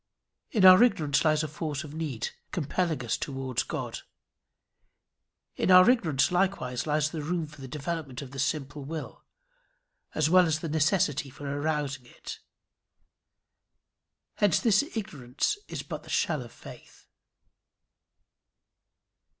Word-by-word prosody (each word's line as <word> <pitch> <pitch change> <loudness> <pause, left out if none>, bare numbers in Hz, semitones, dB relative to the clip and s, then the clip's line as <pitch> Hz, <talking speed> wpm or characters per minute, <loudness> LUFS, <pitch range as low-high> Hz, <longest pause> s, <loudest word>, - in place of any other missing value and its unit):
In 205 -6 +3
our 185 +2 +10
ignorance 155 - +3
lies 155 -1 +3
a - - -2
force 155 -1 -4
of 150 -1 -10
need, 150 -8 -3 0.2
compelling 160 -3 -1
us 115 - 0
towards 130 -3 -3
God. - - -5 1.6
In - - -1
our 185 +1 +8
ignorance 170 - +3
likewise 175 -9 0
lies 150 0 +1
the 160 - -4
room 165 +2 -2
for 150 -1 -14
the 135 - -7
development 145 -1 -5
of 130 - -11
the 135 - -7
simple 145 +1 -2
will, 155 +2 -7 0.9
as 155 -1 +2
well 180 +1 +5
as 155 -1 0
the 165 - -4
necessity 150 -2 +1
for 145 +2 -10
arousing 145 -2 -2
it. - - -9 2.0
Hence 205 -6 +3
this 210 -3 +4 0.2
ignorance 145 - -2
is - - -5
but - - -6
the - - -15
shell - - 0
of - - -10
faith. - - -14
155 Hz, 135 wpm, -28 LUFS, 140-170 Hz, 2.0 s, our